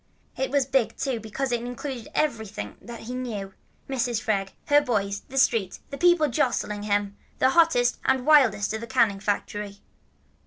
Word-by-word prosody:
It 265 - -1
was 280 0 +2
big, 260 -3 0
too, 265 -3 -1
because 235 +5 -3
it 240 -1 0
included 245 0 -6
everything 220 - -2
that 235 -1 -9
he 240 +3 -7
knew, 215 -6 -5 0.3
Mrs. 245 -3 -1
Freg, 205 -4 -1 0.2
her 290 0 +5
boys, 200 -6 -1
the 270 - -6
street, 225 -7 +2
the 280 - -5
people 345 -3 +5
jostling 230 -5 -1
him, 205 -1 -1 0.2
and 260 - +4
hottest 265 -7 +3
and 265 -1 +1
wildest 235 -10 +4
of - - -1
all - - -10
the - - -12
canning 225 -6 +3
factory. 205 0 -3
240 Hz, 170 wpm, -25 LUFS, 205-265 Hz, 0.3 s, her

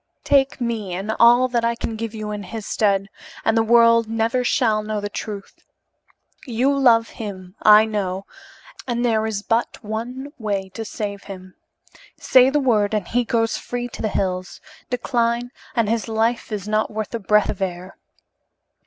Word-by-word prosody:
Take 275 -1 +2
me 225 -7 -3
and 200 +4 -3
all 240 +2 +6
that 240 -1 0
I 235 0 +1
can 230 -1 -4
give 225 0 -5
you 215 -1 -5
in 210 -1 -4
his 205 +2 -7
stead, 195 -2 +1 0.4
and 225 - +3
the 225 - +4
world 230 0 +5
never 225 +3 0
shall 225 -3 +2
know 215 0 -3
the 205 0 -4
truth. 200 -2 -7 0.9
You 255 +4 +1
love 235 -4 +4
him, 185 -4 -8
I 215 0 +7
know, 195 -3 -3 0.6
and 240 0 -1
there 220 -2 +1
is 205 -2 -3
but 230 +2 -1
one 245 +6 -5
way 200 -3 -2
to 225 +4 -6
save 205 -2 -5
him. 185 -2 -10 0.6
Say 255 0 +5
the 295 +2 +1
word 220 -6 +2
and 205 -4 -2
he 245 +1 +1
goes 225 -1 0
free 245 0 -4
to - - -8
the 215 - 0
hills; 185 -2 -2 0.3
decline 240 -1 -1 0.2
and 230 -3 +2
his 230 +1 -1
life 225 +1 0
is 205 -2 -4
not 215 0 +1
worth 215 +1 -5
a 230 - -2
breath 210 0 +2
of - - -9
air." 185 0 -4
220 Hz, 175 wpm, -21 LUFS, 205-235 Hz, 0.9 s, I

